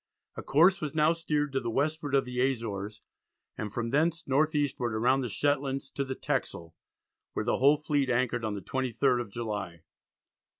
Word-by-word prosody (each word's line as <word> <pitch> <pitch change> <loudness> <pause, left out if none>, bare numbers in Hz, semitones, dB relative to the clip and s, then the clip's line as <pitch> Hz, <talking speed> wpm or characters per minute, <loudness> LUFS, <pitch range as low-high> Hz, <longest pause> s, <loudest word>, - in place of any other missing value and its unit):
A - - -5
course 175 +7 +4
was 150 -1 -4
now 155 +1 +4
steered 150 -3 -1
to 135 - +1
the 120 - -3
westward 145 +3 0
of 135 - +3
the 125 0 -4
Azores, 110 -5 -2 0.5
and 105 -1 -5
from 115 +1 -3
thence 165 +4 +1
north 150 +4 +2
eastward 125 -6 0
round 130 +3 +3
the 125 - -3
Shetlands 135 +2 -1
to 140 - -2
the 135 -1 -4
Texel, 85 -8 -3 0.6
where 110 - -2
the 120 - +1
whole 140 +3 +5
fleet 145 -2 0
anchored 120 -1 0
on 110 -2 -2
the 100 - -5
23rd 130 +1 0
of 115 - -7
July. 100 -7 -5
130 Hz, 180 wpm, -29 LUFS, 115-145 Hz, 0.6 s, whole